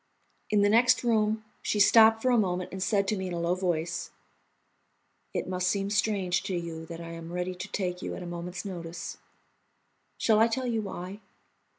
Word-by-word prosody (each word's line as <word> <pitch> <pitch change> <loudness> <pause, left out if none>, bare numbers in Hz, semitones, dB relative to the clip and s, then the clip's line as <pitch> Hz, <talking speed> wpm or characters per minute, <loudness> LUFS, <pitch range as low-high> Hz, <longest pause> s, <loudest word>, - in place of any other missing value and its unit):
In 205 -1 +3
the 205 - +4
next 245 +4 +4
room 220 -2 +1 0.2
she 210 - -1
stopped 225 +1 +6
for 255 - +3
a 245 - +4
moment 180 -3 -1
and 190 - -6
said 200 0 +1
to 215 - +1
me 190 -1 -3
in 180 - -4
a 170 - -2
low 170 +1 +1
voice: 175 -2 -2 1.2
"It - - -3
must 180 0 -1
seem 195 +1 0
strange 195 -3 +1
to 190 - -2
you 165 -2 -5
that 165 0 -7
I 165 0 -7
am 165 0 -8
ready 180 +1 -2
to 180 - -7
take 180 -2 -3
you - - -4
at 185 - -7
a - - -7
moment's 175 +3 -6
notice. 170 -3 -6 1.0
Shall 215 -2 +3
I 225 - +6
tell 255 +3 -2
you 230 -3 0
why? 195 0 -6
190 Hz, 200 wpm, -28 LUFS, 175-215 Hz, 1.2 s, stopped